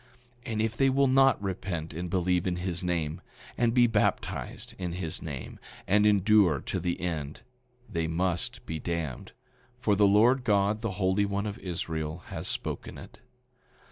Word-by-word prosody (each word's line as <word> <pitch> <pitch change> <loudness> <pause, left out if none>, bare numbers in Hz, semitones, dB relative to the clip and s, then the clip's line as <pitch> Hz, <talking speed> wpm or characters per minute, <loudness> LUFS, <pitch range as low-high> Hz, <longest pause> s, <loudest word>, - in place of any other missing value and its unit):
9:24 - - -3
And 110 - 0
if 110 0 -1
they 135 -1 +4
will 135 +1 +3
not 135 +1 +5
repent 90 -4 -3
and 85 +3 -4
believe 90 +1 +1
in 90 - 0
his 90 -1 -3
name, 85 -4 -2 0.3
and 120 -1 +2
be 120 0 +5
baptized 110 -3 -1
in 90 -2 -3
his 85 -3 -3
name, 70 -5 -7 0.3
and 105 +3 +4
endure 100 -6 +4
to 95 - -3
the 85 0 -2
end, 80 -5 -4 0.4
they 85 -1 -2
must 85 0 -1
be 80 -1 -4
damned; 80 -7 -4 0.4
for 110 -5 +2
the 100 0 +5
Lord 120 +6 +4
God, 105 -1 +2
the 115 -5 -2
Holy 100 +1 +2
One 100 +1 -2
of 105 -1 -5
Israel, 80 -3 -4
has - - -5
spoken - - -3
it. - - -12
95 Hz, 170 wpm, -28 LUFS, 85-105 Hz, 0.4 s, not